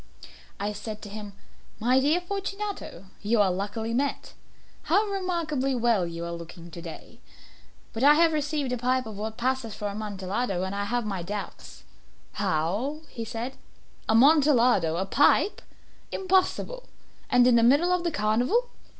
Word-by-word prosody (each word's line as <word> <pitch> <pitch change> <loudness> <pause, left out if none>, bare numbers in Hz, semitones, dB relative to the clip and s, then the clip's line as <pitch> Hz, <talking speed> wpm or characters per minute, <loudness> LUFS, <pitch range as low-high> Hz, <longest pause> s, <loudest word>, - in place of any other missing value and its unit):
I 205 +1 -2
said 210 +1 -6
to 205 - -7
him 205 0 -8 0.5
"My 250 +4 +3
dear 300 +6 +2
Fortunato, 395 - -5 0.2
you 220 +2 +1
are 195 -2 +4
luckily 210 +4 -3
met. 275 +3 -2 0.5
How 385 +8 +3
remarkably 340 -9 -1
well 230 -7 +2
you 170 0 -5
are 170 - -4
looking 170 0 -9
to 170 - -8
day! 165 -2 -10 0.7
But 225 - -3
I 295 +2 +8
have 330 0 +4
received 295 -3 -1
a 250 - -2
pipe 255 +1 +1
of 220 -2 -7
what 220 +2 -5
passes 250 -3 -1
for 210 - -4
Amontillado, 200 -1 -3
and 190 +1 -3
I 200 0 -2
have 240 +2 -1
my 195 -4 -3
doubts." 200 +3 -7 0.5
"How?" 200 - -1 0.2
said 230 +3 -4
he. - - -23 0.5
"Amontillado? 245 - +5
A 190 +3 -1
pipe? 295 - +3 0.5
Impossible! 385 +6 0 0.4
And 245 0 +5
in 250 -1 +5
the 235 - +5
middle 285 +10 +4
of 360 -1 0
the 345 - +1
carnival!" 250 - +1
235 Hz, 155 wpm, -27 LUFS, 200-295 Hz, 0.7 s, I